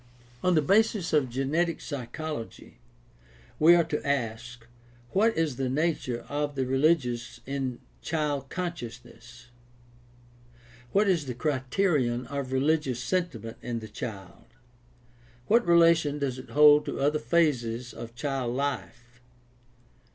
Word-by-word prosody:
— 120 0 -27
On 180 -1 +3
the 155 - +3
basis 200 0 +2
of 145 -4 +3
genetic 150 +7 0
psychology 140 - -7 0.8
we 165 +3 +7
are 170 - +4
to 155 -2 -3
ask, 120 -3 -3 0.5
What 220 +2 +2
is 155 -6 0
the 130 -1 -1
nature 135 -4 -1
of 145 0 -2
the 135 -1 0
rehgious 130 -3 +1
in 135 -2 -3 0.2
child 145 -4 -2
consciousness? 120 -8 -7 1.4
What 205 +1 +3
is 170 -7 +1
the 125 - -4
criterion 130 -2 0
of 140 0 -5
religious 135 -2 +1
sentiment 125 - -3
in 120 -1 -3
the 110 -1 -7
child? 100 -5 -8 1.0
What 235 0 +3
relation 165 -3 +4
does 135 -3 -2
it 130 - -11
hold 150 0 +6
to - - -4
other 145 +2 +2
phases 120 -5 0
of 115 +1 -9
child 130 -2 -2
life 125 -3 -4
140 Hz, 125 wpm, -27 LUFS, 120-160 Hz, 1.4 s, we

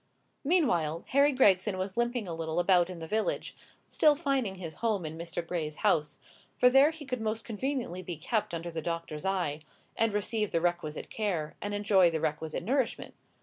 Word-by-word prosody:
Meanwhile, 205 - +1
Harry 280 +2 +5
Gregson 200 -6 +3
was 190 +1 -3
limping 240 -2 0
a 170 - -4
little 165 0 -2
about 175 0 +4
in 180 - -6
the 165 - -6
village, 215 +6 -2 0.3
still 300 -1 +4
finding 275 - -1
his 170 -4 -7
home 215 -7 0
in 155 +1 -5
Mr. 170 +1 -5
Gray's 160 -3 -3
house; 150 -1 +1 0.4
for 250 - +5
there 270 +3 +7
he 315 -2 -8
could 250 -3 -3
most 220 +1 -2
conveniently 235 -5 -3
be 175 -2 -6
kept 205 +3 -1
under 170 +1 -5
the 165 -1 -4
doctor's 165 -1 -4
eye, 180 -6 0 0.4
and 225 -1 +2
receive 210 +1 -1
the 165 - +1
requisite 175 -3 -2
care, 180 -9 -2
and 205 0 -3
enjoy 200 -3 +4
the 160 -1 -2
requisite 155 +2 -2
nourishment. 255 +4 -1
190 Hz, 185 wpm, -30 LUFS, 165-235 Hz, 0.4 s, there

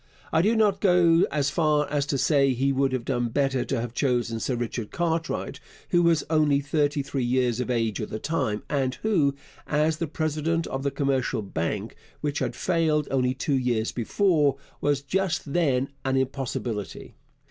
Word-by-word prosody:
I 160 - +4
do 215 +6 +2
not 205 -3 +2
go 175 -3 +4
as 140 -2 0
far 150 -3 +2
as 145 -1 0
to 140 - 0
say 140 -1 +3
he 135 +3 +1
would 135 0 +1
have 130 -2 -2
done 120 -3 0
better 135 0 +1
to 135 - -1
have 120 0 -4
chosen 120 -4 0
Sir 125 - -1
Richard 120 -2 -4
Cartwright, 165 -2 -2 0.3
who 175 - +3
was 170 -2 +3
only 150 -3 +3
thirty 145 0 0
three 135 -1 -3
years 125 -1 +1
of 125 - -2
age 115 -3 0
at 105 - -4
the - - -4
time, 130 -6 -2
and 130 -3 0
who, 160 -11 +2 0.3
as 155 +1 +1
the 165 - -2
president 155 +2 -1
of 135 - -4
the 140 - 0
Commercial 135 -4 -1
Bank, 95 +3 -3 0.2
which 150 -1 -2
had - - -2
failed 160 -4 +1
only 130 -1 +1
two 140 +1 0
years 120 -3 0
before, 145 - +2 0.2
was 145 -1 +1
just 165 -3 -1
then 135 -6 +1
an 135 0 +1
impossibility. 130 -5 -3
140 Hz, 180 wpm, -26 LUFS, 125-155 Hz, 0.3 s, I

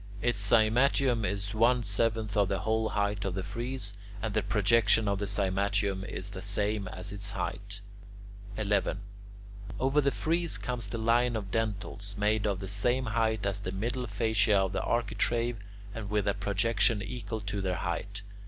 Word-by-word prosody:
Its 120 -1 +1
cymatium 115 +4 +3
is 100 -1 -2
one 120 +2 +3
seventh 110 +1 +1
of 100 -3 +3
the 95 - 0
whole 110 +1 +1
height 100 -1 -1
of 95 -2 -2
the 95 - -2
frieze, 120 -2 -4 0.3
and 110 0 -3
the 110 - +2
projection 110 +1 +3
of 100 -1 0
the 100 - -2
cymatium 100 0 0
is 100 -2 -4
the 95 -2 -7
same 105 0 -1
as 95 +2 -5
its 100 0 -3
height. 100 0 -4 0.8
11. 100 -2 +1 0.8
Over 135 +3 +3
the 140 - +3
frieze 165 +4 0
comes 125 -4 -3
the 110 - -4
line 120 +2 +2
of 100 -3 -4
dentils, 100 -2 -2
made 105 +1 +1
of 100 -2 0
the 95 - -5
same 120 +6 +1
height 110 -2 0
as 100 0 0
the 95 -2 -4
middle 120 +6 -2
fascia 110 0 +2
of 95 0 +1
the - - 0
architrave 115 +1 0 0.4
and 105 -3 -6
with 105 -1 0
a 100 - +3
projection 100 +1 +1
equal 110 -1 -5
to 100 -1 -4
their 95 -1 -1
height. 100 +4 -4
105 Hz, 170 wpm, -30 LUFS, 100-115 Hz, 0.8 s, cymatium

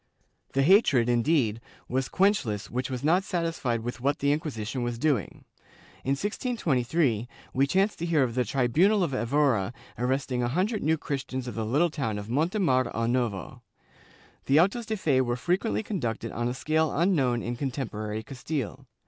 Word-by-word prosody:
The 135 - +3
hatred, 140 - +5
indeed, 120 -2 +2 0.3
was 130 +1 -1
quenchless 150 - +1
which 125 +2 -2
was 130 -1 -4
not 175 +5 +3
satisfied 165 - -1
with 120 +1 -5
what 140 +3 +1
the 140 0 +1
Inquisition 130 -5 -3
was 120 -1 -2
doing. 130 - -1 0.6
In 135 - +1
1623 155 - 0 0.3
we 135 +2 +3
chance 195 +7 +2
to 170 - -3
hear 160 -5 +3
of 120 -3 -1
the 125 +1 +1
tribunal 150 - +2
of 155 -6 -1
Evora 125 -4 +1 0.3
arresting 130 0 0
a 120 - +1
hundred 190 - 0
New 160 +2 +2
Christians 130 -3 -4
of 120 - -4
the 110 -1 -3
little 150 +8 +2
town 135 -9 -2
of 105 +1 -7
Montemor 150 - +2
o 115 +1 0
Novo.^ 120 -5 -2 0.9
The 140 +3 +5
autos 210 +7 +2
de 220 - -1
fe 140 -8 +2
were 120 -1 0
frequently 185 - 0
conducted 120 - -3
on 120 +1 -2
a 120 - -2
scale 155 +3 +1
unknown 140 - +2
in 120 +1 -3
contemporary 110 -5 -4
Castile. 135 0 -5
135 Hz, 165 wpm, -27 LUFS, 120-165 Hz, 0.9 s, hatred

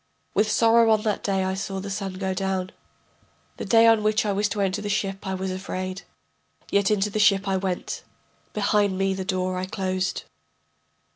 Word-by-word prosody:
With 215 +1 +2
sorrow 230 0 +4
on 215 -1 +3
that 210 -2 -1
day 195 -1 0
I 190 0 -1
saw 195 0 -4
the 200 +1 -6
sun 195 -1 -3
go 190 0 -2
down. 190 -1 -2 0.9
The - - -5
day 225 -1 +5
on 225 -1 +5
which 215 +1 +1
I 205 - +1
was 205 +1 +1
to 205 - -3
enter 195 +1 0
the 205 - -4
ship 195 -2 -2
I 190 - -1
was 190 0 -3
afraid. 185 0 -4 0.7
Yet 200 -1 +3
into 210 -1 +1
the 215 - -2
ship 200 -1 +4
I 190 -1 +1
went, 185 -1 -3 0.5
behind 205 -2 +1
me 195 0 +1
the 190 0 -4
door 185 -1 -1
I 185 - -3
closed. 185 0 -2
195 Hz, 195 wpm, -24 LUFS, 190-210 Hz, 0.9 s, day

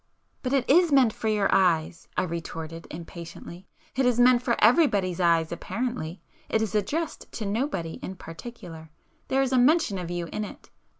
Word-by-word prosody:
"But 255 0 -2
it 265 -3 +2
is 340 +3 +5
meant 260 -6 +5
for 220 - -4
your 210 -2 +2
eyes,"—I 170 -2 +1
retorted 165 -1 -6
impatiently—"It 170 +8 -7
is 245 -1 +2
meant 245 0 +6
for 245 -2 +1
everybody's 210 - +3
eyes 165 -2 +3
apparently,—it 195 -1 -4
is 220 -1 -2
addressed 290 - -2
to 220 - -4
nobody 200 - -2
in 190 - -6
particular. 165 -3 -10 0.4
There 270 +1 +2
is 265 - -1
a 255 - +5
mention 250 - +3
of 175 -2 -5
you 175 -1 -3
in 215 - -3
it. 210 - -10
205 Hz, 160 wpm, -26 LUFS, 170-250 Hz, 0.4 s, meant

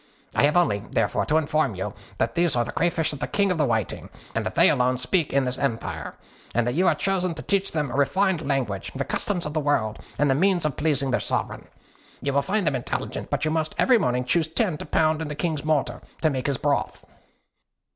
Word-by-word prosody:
I - - +4
have 150 +4 +3
only, 105 - +2
therefore, - - 0
to 155 - +3
inform 155 -7 +1
you 95 +2 -4 0.2
that 110 - 0
these 170 -4 +1
are 120 -1 +2
the 120 - -5
crayfish 165 -2 0
of 145 - -7
the - - -2
King 200 -2 +1
of 175 - -1
the 150 - +3
Whiting, 110 -4 -2 0.2
that - - -2
they - - +7
alone 125 0 +2
speak 145 +6 0
in 140 -1 +2
this 125 0 -3
empire, 110 - -3 0.4
and 120 -1 +2
that 120 - 0
you 180 +6 +2
are - - +4
chosen 185 -3 0
to - - -7
teach 195 -1 0
them 150 -5 -1
refined 180 +6 +2
language, 130 -10 -2
the 140 0 -2
customs 185 -4 -2
of 150 - -4
the 155 - +1
world, 125 -8 0 0.2
and 145 - +3
the 135 - +4
means 180 +3 +2
of 150 -4 0
pleasing 140 -4 0
their - - +2
sovereign. - - -3 0.5
You 140 0 -2
will 140 - +3
find 200 +4 0
them 150 -3 +2
intelligent; 125 - -4
but - - -1
you 155 - +1
must 155 -1 -1
every 250 -3 +5
morning 125 -5 0
choose 160 +5 +2
ten 180 +1 0
to - - -7
pound 155 0 +2
in 160 - -3
the 150 - -5
King's 155 -2 -2
mortar, 155 -3 0 0.2
to 155 - +4
make 130 -1 -2
his 140 -2 0
broth." 145 +1 -1
150 Hz, 230 wpm, -25 LUFS, 130-165 Hz, 0.5 s, they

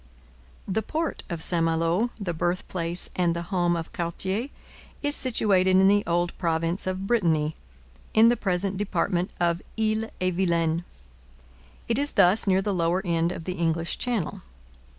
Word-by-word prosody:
The 210 +3 0
port 320 +9 -3
of 170 -3 -2
St 170 -2 +4
Malo, 165 +7 +1
the 190 -4 -3
birthplace 175 0 -2
and 175 -2 +1
the 170 - -3
home 175 -1 +2
of 165 -1 -5
Cartier, 190 +7 -2 0.6
is 290 0 +2
situated 195 -7 +3
in 190 0 +6
the 205 +1 +4
old 175 +1 0
province 165 +1 -1
of 185 +1 -2
Brittany, 165 -9 +1 0.6
in 220 +1 +6
the 240 - +4
present 190 -2 -1
department 190 -2 -1
of 170 0 +1 0.2
Ille 220 0 0
et 185 0 0
Vilaine. 170 -2 0 1.0
It 230 +2 +1
is 290 +1 +1
thus 190 +4 +4
near 190 0 +3
the 205 - -1
lower 180 +2 0
end 170 0 +1
of 165 - -6
the 180 - -3
English 165 0 -1
Channel. 235 -9 -2
180 Hz, 155 wpm, -26 LUFS, 170-205 Hz, 1.0 s, in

